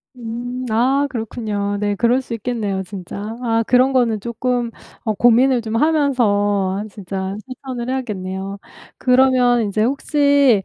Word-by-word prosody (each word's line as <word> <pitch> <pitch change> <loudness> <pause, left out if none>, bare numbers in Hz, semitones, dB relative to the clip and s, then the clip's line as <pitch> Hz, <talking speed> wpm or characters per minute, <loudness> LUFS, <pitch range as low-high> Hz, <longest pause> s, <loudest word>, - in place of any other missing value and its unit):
음 240 +1 -5
아 260 +6 +2
그렇군요. 215 -4 -3
네 205 0 0
그럴 240 +5 +2
수 255 - -7
있겠네요, 210 -4 -2
진짜. 200 +3 -7
아 230 -2 +1
그런 255 +2 +4
거는 235 -4 +2
조금 240 +2 -2 0.4
어 220 - +1
고민을 245 +3 +4
좀 220 0 -4
하면서 205 -10 +2
아 - - -5
진짜 190 -1 -5
실천을 255 -1 -6
해야겠네요. 195 -6 -4 0.4
그러면 250 -1 +4
인제 215 0 0
혹시 280 -3 +3
235 Hz, 275 characters per minute, -19 LUFS, 205-255 Hz, 0.4 s, 그런